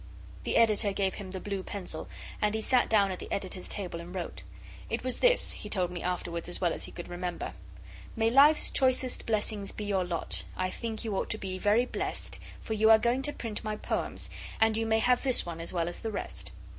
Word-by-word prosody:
The -, -, +1 dB
Editor 215 Hz, -2 st, +5 dB
gave 195 Hz, -1 st, 0 dB
him 200 Hz, -3 st, -7 dB
the 190 Hz, 0 st, -5 dB
blue 200 Hz, 0 st, -3 dB
pencil, 185 Hz, -4 st, -4 dB, 0.3 s
and 210 Hz, +1 st, +2 dB
he 220 Hz, -, -1 dB
sat 250 Hz, +2 st, +3 dB
down 200 Hz, -3 st, +4 dB
at 185 Hz, -, -5 dB
the -, -, -8 dB
Editor's 185 Hz, -2 st, -2 dB
table 180 Hz, -4 st, -4 dB
and 175 Hz, +2 st, -9 dB
wrote. 180 Hz, -, -5 dB, 0.5 s
It -, -, -2 dB
was 255 Hz, -1 st, +1 dB
this, -, -, +4 dB
he 210 Hz, -, -6 dB
told 180 Hz, -4 st, 0 dB
me 175 Hz, -, -5 dB
afterwards 175 Hz, -1 st, -3 dB
as 175 Hz, -, +3 dB
well 175 Hz, -3 st, +2 dB
as -, -, -5 dB
he -, -, -8 dB
could 175 Hz, -, -7 dB
remember 175 Hz, 0 st, -4 dB, 0.6 s
May 225 Hz, -1 st, +2 dB
Life's 290 Hz, +4 st, +6 dB
choicest 255 Hz, -1 st, +2 dB
blessings 210 Hz, -2 st, 0 dB
be 210 Hz, -, -6 dB
your 195 Hz, -2 st, +1 dB
lot 175 Hz, -2 st, -2 dB
I 185 Hz, 0 st, 0 dB
think 225 Hz, +1 st, -4 dB
you 215 Hz, -3 st, -1 dB
ought -, -, -1 dB
to 215 Hz, -, +1 dB
be 185 Hz, -2 st, -5 dB
very 215 Hz, +5 st, +4 dB
blest -, -, -3 dB, 0.2 s
For 220 Hz, -, -3 dB
you 220 Hz, +1 st, +4 dB
are 220 Hz, -, +10 dB
going 240 Hz, +4 st, +1 dB
to 290 Hz, -, -1 dB
print 225 Hz, -6 st, -5 dB
my 215 Hz, -1 st, -2 dB
poems -, -, -2 dB, 0.3 s
And 220 Hz, 0 st, +4 dB
you 225 Hz, 0 st, 0 dB
may 220 Hz, 0 st, +3 dB
have 245 Hz, +2 st, +3 dB
this 260 Hz, -3 st, +4 dB
one 165 Hz, -1 st, -5 dB
as 165 Hz, -, -1 dB
well 170 Hz, -2 st, 0 dB
as 175 Hz, -, -4 dB
the 225 Hz, -, -3 dB
rest. 205 Hz, -, -5 dB
205 Hz, 230 wpm, -30 LUFS, 185-225 Hz, 0.6 s, are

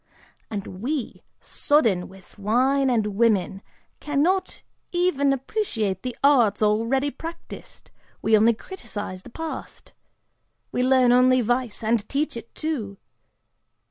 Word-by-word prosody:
And 195 Hz, -3 st, -6 dB
we, 270 Hz, 0 st, -3 dB, 0.2 s
sodden 225 Hz, -12 st, +2 dB
with 190 Hz, +2 st, -17 dB
wine 260 Hz, +6 st, +2 dB
and 230 Hz, -4 st, +2 dB
women, 200 Hz, -4 st, +2 dB, 0.4 s
cannot 305 Hz, +6 st, 0 dB, 0.3 s
even 350 Hz, -6 st, +2 dB
appreciate 250 Hz, -, -2 dB
the 250 Hz, -1 st, -5 dB
arts 240 Hz, -8 st, +4 dB
already 230 Hz, +7 st, +1 dB
practiced, 330 Hz, +3 st, -10 dB, 0.3 s
we 220 Hz, -, +3 dB
only 220 Hz, +2 st, +4 dB
criticise 205 Hz, -, -7 dB
the 250 Hz, -, -13 dB
past! 320 Hz, +5 st, -7 dB, 0.8 s
We -, -, -1 dB
learn 255 Hz, -1 st, +4 dB
only 255 Hz, +1 st, +5 dB
vice, 240 Hz, -1 st, -1 dB
and 220 Hz, -1 st, 0 dB
teach 285 Hz, 0 st, -1 dB
it, 230 Hz, 0 st, -9 dB
too. 240 Hz, -11 st, -3 dB
245 Hz, 115 wpm, -24 LUFS, 215-280 Hz, 0.8 s, only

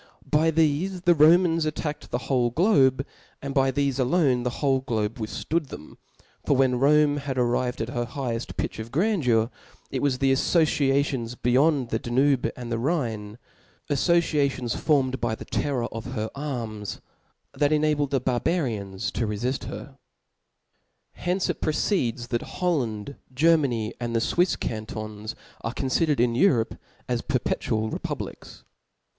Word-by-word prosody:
By 155 Hz, +2 st, +4 dB
thefe 165 Hz, +4 st, +1 dB
the 175 Hz, -1 st, +6 dB
Romans 165 Hz, +1 st, +5 dB
attacked 150 Hz, 0 st, -4 dB
the -, -, -1 dB
whole 125 Hz, -3 st, +2 dB
globe, 135 Hz, -, +3 dB, 0.3 s
and 140 Hz, 0 st, -5 dB
by 135 Hz, -1 st, +3 dB
thefe 140 Hz, 0 st, 0 dB
alone 130 Hz, -1 st, +2 dB
the 125 Hz, -, -1 dB
>vhole 135 Hz, +1 st, 0 dB
globe 115 Hz, -2 st, -2 dB
withftood 150 Hz, +8 st, -2 dB
them: 75 Hz, -, -10 dB, 0.5 s
for 140 Hz, -, +2 dB
when 130 Hz, -2 st, +3 dB
Rome 150 Hz, +2 st, +4 dB
was 135 Hz, -, 0 dB
arrived 125 Hz, -1 st, 0 dB
to 120 Hz, -, -8 dB
her 120 Hz, -1 st, -2 dB
higheft 125 Hz, -2 st, -4 dB
pitch -, -, -3 dB
of 110 Hz, +1 st, -7 dB
grandeur, 135 Hz, -, +2 dB, 0.4 s
it 130 Hz, -, -2 dB
was 140 Hz, -3 st, +1 dB
the 135 Hz, 0 st, +2 dB
affociations 135 Hz, -4 st, +1 dB
beyond 130 Hz, +1 st, +2 dB
the 110 Hz, -, -1 dB
Danube 130 Hz, +2 st, +2 dB
and 120 Hz, -2 st, -7 dB
the 115 Hz, -, -1 dB
Rhine, 115 Hz, -7 st, -2 dB, 0.5 s
af 140 Hz, -, +1 dB
fociations 145 Hz, -7 st, +1 dB
formed 135 Hz, -4 st, +1 dB
by 115 Hz, -2 st, 0 dB
the -, -, -10 dB
terror 135 Hz, -5 st, -1 dB
of 115 Hz, +3 st, -6 dB
her 110 Hz, -3 st, -3 dB
arms, 115 Hz, -8 st, -5 dB, 0.5 s
that 145 Hz, 0 st, +1 dB
enabled 150 Hz, -2 st, +2 dB
the 135 Hz, -, +1 dB
Barbarians 115 Hz, -, -1 dB
to 115 Hz, -, -1 dB
rcfift 120 Hz, +6 st, -2 dB
her. -, -, -6 dB
From -, -, -19 dB, 1.1 s
hence 180 Hz, +1 st, -1 dB
it -, -, -3 dB
proceeds 130 Hz, -, 0 dB
that 120 Hz, -2 st, 0 dB, 0.2 s
Holland 140 Hz, -, -1 dB
*, -, -, -30 dB
Ger 165 Hz, +5 st, +5 dB
many, 120 Hz, -8 st, -1 dB
and 120 Hz, -1 st, -3 dB
the -, -, +3 dB
Swifs 175 Hz, +8 st, +2 dB
Cantons, 110 Hz, -1 st, -5 dB, 0.3 s
are 115 Hz, +2 st, -3 dB
confidered 140 Hz, +2 st, +1 dB
in 120 Hz, 0 st, +3 dB
Europe 120 Hz, -, +3 dB, 0.3 s
as 120 Hz, -2 st, -1 dB
perpetual 110 Hz, -4 st, -1 dB
republics. -, -, -6 dB
130 Hz, 150 wpm, -25 LUFS, 120-150 Hz, 1.1 s, the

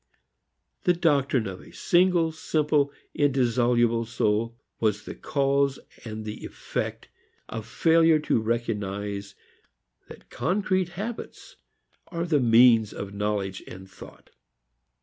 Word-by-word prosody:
The 180 Hz, -, +5 dB
doctrine 140 Hz, -7 st, +2 dB
of 95 Hz, -2 st, -6 dB
a -, -, -15 dB
single, 175 Hz, -2 st, +2 dB
simple 150 Hz, -2 st, +1 dB, 0.2 s
and -, -, -5 dB
indissoluble 120 Hz, -3 st, +2 dB
soul 115 Hz, 0 st, -1 dB, 0.2 s
was 105 Hz, -2 st, 0 dB
the -, -, -6 dB
cause 140 Hz, -1 st, 0 dB, 0.3 s
and 110 Hz, -1 st, -6 dB
the 105 Hz, 0 st, -7 dB
effect -, -, -5 dB, 0.4 s
of 115 Hz, -1 st, -6 dB
failure 165 Hz, +5 st, +4 dB
to 120 Hz, -, +1 dB
recognize 105 Hz, -3 st, -3 dB, 0.7 s
that -, -, -14 dB
concrete 185 Hz, -1 st, 0 dB
habits 235 Hz, -, -7 dB, 0.5 s
are 170 Hz, -1 st, -3 dB
the 155 Hz, -4 st, +2 dB
means 115 Hz, -2 st, +5 dB
of 100 Hz, 0 st, -7 dB
knowledge 100 Hz, -2 st, -2 dB
and 95 Hz, +1 st, -10 dB
thought. 95 Hz, -1 st, -15 dB
120 Hz, 115 wpm, -26 LUFS, 105-155 Hz, 0.7 s, The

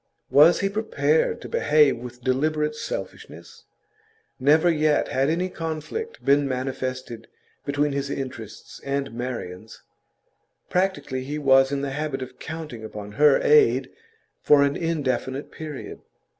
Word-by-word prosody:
Was 155 Hz, +5 st, +6 dB
he 195 Hz, -, +2 dB
prepared 160 Hz, -8 st, 0 dB
to -, -, -7 dB
behave 150 Hz, -4 st, +3 dB
with 125 Hz, 0 st, -10 dB
deliberate 150 Hz, +4 st, 0 dB
selfishness? -, -, -8 dB, 0.7 s
Never 150 Hz, +6 st, +4 dB
yet 155 Hz, -3 st, +2 dB
had 135 Hz, +2 st, +1 dB
any 175 Hz, +3 st, 0 dB
conflict 165 Hz, -, -6 dB
been 140 Hz, 0 st, +4 dB
manifested 130 Hz, -2 st, -4 dB, 0.4 s
between 145 Hz, +1 st, +1 dB
his 140 Hz, 0 st, -3 dB
interests 130 Hz, -6 st, -7 dB
and 140 Hz, -2 st, -2 dB
Marian's; 115 Hz, -5 st, -6 dB, 0.9 s
practically 160 Hz, -8 st, -1 dB
he 145 Hz, +3 st, -4 dB
was 135 Hz, -2 st, +4 dB
in 140 Hz, -1 st, -1 dB
the 140 Hz, -, -2 dB
habit 140 Hz, -2 st, -3 dB
of 130 Hz, -, -12 dB
counting 155 Hz, -8 st, -7 dB
upon 105 Hz, -1 st, -8 dB
her 145 Hz, +4 st, +4 dB
aid 450 Hz, -2 st, +4 dB, 0.5 s
for 145 Hz, -1 st, +5 dB
an 140 Hz, 0 st, +1 dB
indefinite 140 Hz, -4 st, -2 dB
period. 155 Hz, -3 st, -8 dB
140 Hz, 130 wpm, -24 LUFS, 130-155 Hz, 0.9 s, Was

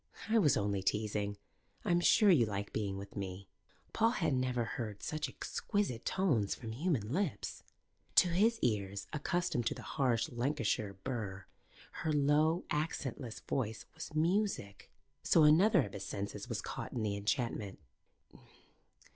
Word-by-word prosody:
"I 225 Hz, +1 st, +5 dB
was 150 Hz, -, +4 dB
only 100 Hz, -1 st, 0 dB
teasing. 105 Hz, 0 st, -1 dB, 0.5 s
I'm 175 Hz, 0 st, +3 dB
sure 205 Hz, +3 st, +6 dB
you 125 Hz, -10 st, +5 dB
like 100 Hz, -1 st, -4 dB
being 100 Hz, -3 st, -2 dB
with 100 Hz, 0 st, -9 dB
me." 95 Hz, -1 st, -5 dB, 0.5 s
Paul 225 Hz, -, +4 dB
had 180 Hz, -, 0 dB
never 125 Hz, -2 st, +1 dB
heard 110 Hz, -3 st, -5 dB
such 155 Hz, -2 st, -2 dB
exquisite 130 Hz, -, -2 dB
tones 140 Hz, -, +1 dB
from 115 Hz, -3 st, -7 dB
human 130 Hz, -, -1 dB
lips. 165 Hz, -, -2 dB, 0.5 s
To 180 Hz, -, +7 dB
his 215 Hz, +7 st, +3 dB
ears, 100 Hz, -4 st, 0 dB
accustomed 150 Hz, -5 st, 0 dB
to -, -, -1 dB
the -, -, -9 dB
harsh 125 Hz, -4 st, +1 dB
Lancashire 120 Hz, -5 st, -1 dB
burr, 100 Hz, -7 st, -4 dB, 0.6 s
her 160 Hz, -, 0 dB
low, 150 Hz, +3 st, +3 dB
accentless 140 Hz, -5 st, -3 dB
voice 110 Hz, -5 st, -2 dB
was 155 Hz, -, -8 dB
music. 170 Hz, -, 0 dB, 0.3 s
So 165 Hz, -, +5 dB
another 170 Hz, +3 st, +6 dB
of 100 Hz, -, -7 dB
his 100 Hz, 0 st, -6 dB
senses 100 Hz, 0 st, -5 dB
was -, -, -3 dB
caught -, -, -5 dB
in 115 Hz, -, -2 dB
the 105 Hz, -2 st, 0 dB
enchantment. 105 Hz, -1 st, -2 dB
125 Hz, 145 wpm, -34 LUFS, 105-160 Hz, 0.6 s, To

